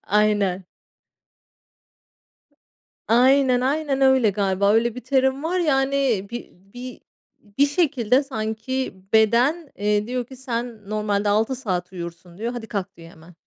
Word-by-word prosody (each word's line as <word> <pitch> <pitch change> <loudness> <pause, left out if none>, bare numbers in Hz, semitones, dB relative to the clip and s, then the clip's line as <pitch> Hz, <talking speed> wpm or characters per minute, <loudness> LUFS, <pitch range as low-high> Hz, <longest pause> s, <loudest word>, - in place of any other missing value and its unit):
Aynen. 205 -3 +1 2.4
Aynen, 255 +2 +4
aynen 275 0 0
öyle 265 -5 +5
galiba, 200 0 +1
öyle 230 +1 +2
bir 250 - -7
terim 265 0 +1
var, 360 +3 0
yani, 270 - +1
bir 240 - -6 0.2
bir 250 +1 -9 0.6
bir 285 - +6
şekilde 280 -5 +1
sanki 260 +1 -3 0.2
beden, 245 +9 +3
eee, 210 +1 0
diyor 250 0 -2
ki 260 - -12
sen 235 -5 -5
normalde 210 -1 0
6 220 +5 +1
saat 185 -8 -3
uyursun 170 0 -9
diyor, 230 +3 -3
hadi 235 -2 -7
kalk 200 -2 -5
diyor 165 0 -12
hemen, 165 +2 -17
235 Hz, 130 wpm, -23 LUFS, 205-265 Hz, 2.4 s, bir